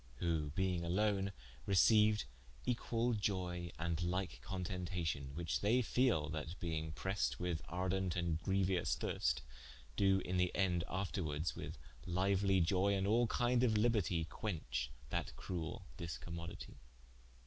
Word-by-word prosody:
Who 80 +1 0
being 90 +1 0
alone 100 +2 +1 0.4
receiued 105 +2 +5 0.4
equal 120 -1 +1
ioye, 90 -5 -1
and 85 0 -1
like 85 -7 -1
contentation, 90 -5 -3
which 85 0 -1
they 120 +5 +3
fele 115 - +2
that 80 +3 -5
being 80 -2 -2
pressed 95 +5 -1
with 85 -3 -1
ardent 90 +1 0
and 85 -2 0
greuous 95 -2 +1
thirste, 60 0 0 0.5
doe 95 -1 +4
in 90 +1 0
the 90 0 +3
ende 90 -3 +2
afterwardes 90 -4 -2
with - - -6 0.3
liuely 95 0 +3
ioye, 100 +3 +3
and 95 - 0
all 115 +4 +4
kinde 120 +2 +2
of 125 -3 +4
libertie, 105 -7 +2
quenche 65 - -3 0.2
that - - -2
cruell 85 0 -4 0.2
discommoditie. 85 -2 -6
90 Hz, 125 wpm, -37 LUFS, 85-100 Hz, 0.5 s, receiued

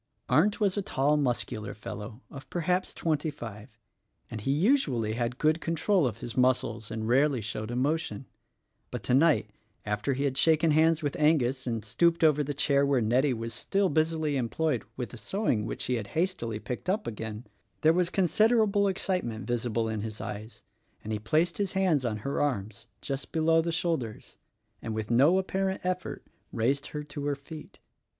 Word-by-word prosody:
Arndt 205 +7 +3
was 205 -2 +1
a - - +1
tall 145 -5 +1
muscular 120 -6 -1
fellow 110 +2 -8
of 135 -1 -10
perhaps 180 +2 0
twenty 155 -1 -1
five, 110 -5 -9 0.5
and 110 -2 -5
he 120 - -3
usually 140 - +2
had 120 +1 -2
good 155 +3 +2
control 165 0 +2
of 110 -3 -4
his 120 - -6
muscles 125 -4 +1
and 110 0 -4
rarely 135 +2 +3
showed 110 0 -4
emotion; 135 +3 -1 0.6
but - - -6
tonight 135 -4 +3 0.2
— 105 - -41
after 120 +7 -1
he 140 - -1
had 135 -1 0
shaken 160 0 +4
hands 160 +1 +3
with 145 - -1
Angus 135 -4 +2
and 115 -3 -2
stooped 170 -1 +2
over 150 -2 +5
the 145 0 -4
chair 140 0 +3
where 140 -2 +3
Nettie 125 +5 +2
was 115 0 -5
still 195 - 0
busily 155 -1 +1
employed 130 +2 0
with 125 -2 -4
the 120 - -9
sewing 110 - -1
which - - -4
she 125 0 0
had 105 -3 -5
hastily 160 - -1
picked 125 +9 -5
up 210 +3 0
again 110 +1 -5 0.2
— - - -44
there 160 +1 +5
was 175 0 +1
considerable 205 +2 +3
excite 190 -1 0
ment 110 -3 -5
visible 115 -1 -1
in 110 -1 -2
his 110 0 -5
eyes, 105 +3 -7 0.4
and 110 - -4
he 105 - -1
placed 155 - +1
his 200 -2 0
hands 185 -8 +2
on 115 -3 -1
her 140 - -1
arms, 110 -8 -2
just 135 0 -4
below 165 0 +3
the 170 +1 -2
shoulders 160 -10 -2 0.2
— - - -44
and 110 - -4
with 110 0 -3
no 140 +10 +5
apparent 190 0 -1
effort 185 0 -3 0.3
raised 135 +5 0
her 150 0 -5
to 145 -1 -6
her 145 - +1
feet. 145 +3 -11
140 Hz, 185 wpm, -28 LUFS, 115-165 Hz, 0.6 s, over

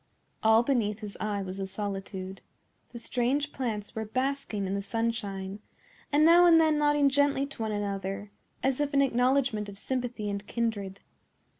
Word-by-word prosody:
All 220 +1 +5
beneath 225 -5 0
his 210 -2 -7
eye 205 -2 -2
was 190 +1 -6
a 195 - -3
solitude. 195 -1 -5 0.5
The 240 - -9
strange 255 +5 0
plants 215 -5 -4
were 220 -1 -3
basking 255 -2 -2
in 190 - -2
the 200 - -1
sunshine, 200 -3 -3 0.5
and 295 +2 +5
now 345 +2 +7
and 330 -1 +7
then 310 -2 +3
nodding 295 -1 +4
gently 280 0 +2
to 275 -4 -9
one 220 -1 -1
another, 200 0 -3 0.3
as 265 +1 +1
if 285 -1 -1
in 275 - +5
acknowledgment 250 -4 +1
of 200 - -10
sympathy 245 -2 -3
and 200 0 -4
kindred. 205 -5 -2
225 Hz, 165 wpm, -29 LUFS, 200-275 Hz, 0.5 s, now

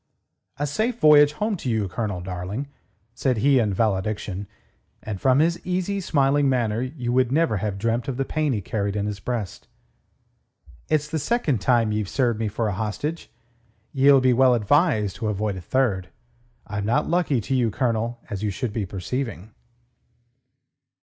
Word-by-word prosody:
"A 145 - -1
safe 220 - -1
voyage 150 -1 +6
home 210 +7 -1
to 130 - -4
you, 110 -3 0
Colonel, 100 -1 -3
darling," 95 +8 -5 0.5
said 125 0 0
he 135 +4 +4
in 110 -3 +1
valediction, 100 -1 -1 0.6
and 105 -3 -5
from 130 -1 +4
his 170 +3 +1
easy, 185 +2 -1
smiling 140 -3 +2
manner 115 -3 0
you 125 -2 -3
would 130 -1 +2
never 155 -6 +2
have 100 0 -3
dreamt 115 +3 -1
of 130 -3 -3
the 135 - 0
pain 155 0 -1
he 110 -5 -1
carried 100 +1 -2
in 105 -1 -1
his 105 -1 -4
breast. 110 -3 -4 1.2
"It's 150 -1 +1
the 160 +1 -2
second 150 - 0
time 115 -1 +2
ye've 105 -2 -2
served 120 -5 0
me 110 - 0
for 110 +2 -2
a 105 - -1
hostage. 110 - -4 0.6
Ye'll 135 0 +5
be 130 -1 +4
well 130 0 +5
advised 115 - +2
to 110 - -3
avoid 105 -1 -1
a 95 - -7
third. 95 -3 0 0.6
I'm 105 -1 -4
not 120 +8 +1
lucky 165 -6 +1
to 115 - -3
you, 125 -3 +2
Colonel, 115 0 -1
as 100 -1 -5
you 105 - 0
should 105 +3 -3
be 105 -4 -2
perceiving." 105 +2 -5
120 Hz, 170 wpm, -24 LUFS, 105-140 Hz, 1.2 s, voyage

